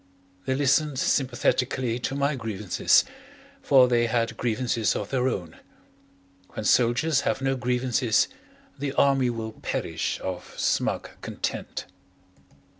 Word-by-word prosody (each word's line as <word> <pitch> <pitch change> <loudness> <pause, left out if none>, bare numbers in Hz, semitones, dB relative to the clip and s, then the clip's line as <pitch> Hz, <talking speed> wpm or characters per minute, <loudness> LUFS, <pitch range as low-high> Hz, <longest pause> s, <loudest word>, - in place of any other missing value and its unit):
They 130 - +1
listened 140 +1 +2
sympathetically 125 -2 0
to 135 - -3
my 140 +1 +1
grievances, 105 -6 +2 0.6
for 130 -2 +5
they 120 -1 +2
had 115 0 0
grievances 115 -2 0
of 105 - -4
their 130 -1 +1
own. 90 -10 -4 1.0
When 110 - -4
soldiers 130 +7 +3
have - - -1
no 135 0 0
grievances 125 -2 +1 0.5
the 140 -1 -2
Army 135 -3 +3
will 115 -2 -4
perish - - -3
of 95 -1 -6
smug - - 0
content. - - -4
125 Hz, 115 wpm, -26 LUFS, 115-135 Hz, 1.0 s, for